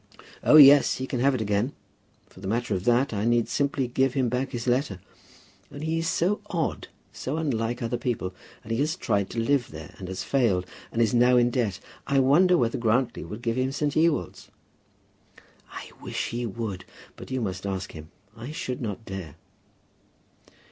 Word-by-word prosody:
"Oh, -, -, +6 dB
yes; 145 Hz, -2 st, +8 dB
he 130 Hz, -, -4 dB
can 130 Hz, -2 st, -3 dB
have 135 Hz, +2 st, +3 dB
it 120 Hz, -, -2 dB
again. 105 Hz, +5 st, 0 dB, 0.5 s
For -, -, -18 dB
the 95 Hz, -, -7 dB
matter 115 Hz, +1 st, -1 dB
of 95 Hz, 0 st, -3 dB
that, 120 Hz, +1 st, +3 dB
I 100 Hz, -1 st, -1 dB
need 120 Hz, 0 st, +2 dB
simply 140 Hz, -2 st, 0 dB
give 130 Hz, +2 st, +1 dB
him 130 Hz, -3 st, +1 dB
back 125 Hz, +3 st, -1 dB
his 120 Hz, -3 st, -5 dB
letter. 125 Hz, -6 st, 0 dB, 0.7 s
Only 145 Hz, +2 st, -6 dB
he 160 Hz, +1 st, 0 dB
is 165 Hz, -, -2 dB
so 180 Hz, +4 st, +1 dB
odd, 165 Hz, -3 st, -2 dB, 0.3 s
so 140 Hz, +4 st, -4 dB
unlike 120 Hz, -6 st, -1 dB
other 120 Hz, +1 st, -2 dB
people! 115 Hz, -7 st, -2 dB, 0.3 s
And 115 Hz, -, -8 dB
he 115 Hz, -, 0 dB
has 155 Hz, +3 st, +1 dB
tried 100 Hz, -, -1 dB
to 115 Hz, -, -4 dB
live 130 Hz, +2 st, +1 dB
there, 80 Hz, -1 st, -10 dB
and 95 Hz, -, -7 dB
has 95 Hz, 0 st, -4 dB
failed; 110 Hz, -10 st, +1 dB, 0.3 s
and 115 Hz, -, +2 dB
is 110 Hz, -, 0 dB
now 125 Hz, +1 st, +5 dB
in 120 Hz, 0 st, +3 dB
debt. 110 Hz, -7 st, -1 dB, 0.3 s
I 140 Hz, -, +1 dB
wonder 165 Hz, +8 st, +5 dB
whether 120 Hz, -2 st, 0 dB
Grantly 120 Hz, +2 st, +1 dB
would 110 Hz, +3 st, -8 dB
give 115 Hz, 0 st, -1 dB
him 130 Hz, +1 st, 0 dB
St. 145 Hz, +1 st, -1 dB
Ewold's?" 160 Hz, 0 st, 0 dB, 1.2 s
"I -, -, -9 dB
wish -, -, -3 dB
he 120 Hz, 0 st, -3 dB
would. 105 Hz, -3 st, -5 dB, 0.3 s
But -, -, -11 dB
you 130 Hz, 0 st, -2 dB
must 95 Hz, -4 st, -3 dB
ask 95 Hz, -1 st, -4 dB
him. 80 Hz, 0 st, -10 dB, 0.3 s
I 115 Hz, +4 st, -8 dB
should 130 Hz, -5 st, -4 dB
not 110 Hz, -1 st, -5 dB
dare." 95 Hz, -6 st, -7 dB
120 Hz, 190 wpm, -26 LUFS, 110-135 Hz, 1.2 s, yes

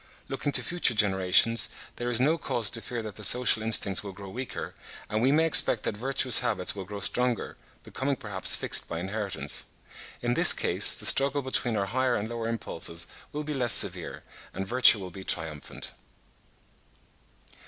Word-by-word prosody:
Looking 135 Hz, +2 st, -4 dB
to -, -, +3 dB
future 175 Hz, -9 st, -1 dB
generations, 100 Hz, +2 st, +3 dB, 0.3 s
there 120 Hz, 0 st, -4 dB
is 120 Hz, -1 st, +1 dB
no 150 Hz, +6 st, +1 dB
cause 115 Hz, -6 st, -2 dB
to 115 Hz, -, -5 dB
fear 115 Hz, +2 st, -7 dB
that 110 Hz, -2 st, -10 dB
the 105 Hz, -, -7 dB
social 120 Hz, +1 st, +5 dB
instincts 105 Hz, -2 st, +1 dB
will 100 Hz, -2 st, -9 dB
grow 100 Hz, +1 st, -12 dB
weaker, 125 Hz, +4 st, -7 dB, 0.4 s
and 110 Hz, +1 st, -2 dB
we 130 Hz, +3 st, +2 dB
may 160 Hz, +3 st, +2 dB
expect 125 Hz, -8 st, +4 dB
that -, -, -4 dB
virtuous 130 Hz, +2 st, +2 dB
habits 95 Hz, -3 st, -1 dB
will 95 Hz, -2 st, -8 dB
grow 100 Hz, +1 st, -9 dB
stronger, 125 Hz, +4 st, -2 dB, 0.3 s
becoming 135 Hz, +1 st, -4 dB
perhaps 105 Hz, -7 st, 0 dB
fixed -, -, 0 dB
by 85 Hz, -, -5 dB
inheritance. 95 Hz, -6 st, -5 dB, 0.6 s
In 120 Hz, 0 st, -1 dB
this -, -, +8 dB
case -, -, +3 dB
the -, -, -5 dB
struggle 140 Hz, +1 st, +3 dB
between 125 Hz, -3 st, -1 dB
our 100 Hz, -, -2 dB
higher 125 Hz, +4 st, -1 dB
and 105 Hz, 0 st, -4 dB
lower 115 Hz, -1 st, -6 dB
impulses 85 Hz, -6 st, -5 dB, 0.3 s
will 150 Hz, +1 st, -6 dB
be 150 Hz, 0 st, -6 dB
less 125 Hz, -5 st, +3 dB
severe, -, -, +3 dB, 0.3 s
and 95 Hz, -, -5 dB
virtue 120 Hz, +2 st, +5 dB
will 95 Hz, -3 st, -9 dB
be 95 Hz, +2 st, -10 dB
triumphant. 80 Hz, -5 st, -4 dB
115 Hz, 175 wpm, -26 LUFS, 100-125 Hz, 0.6 s, this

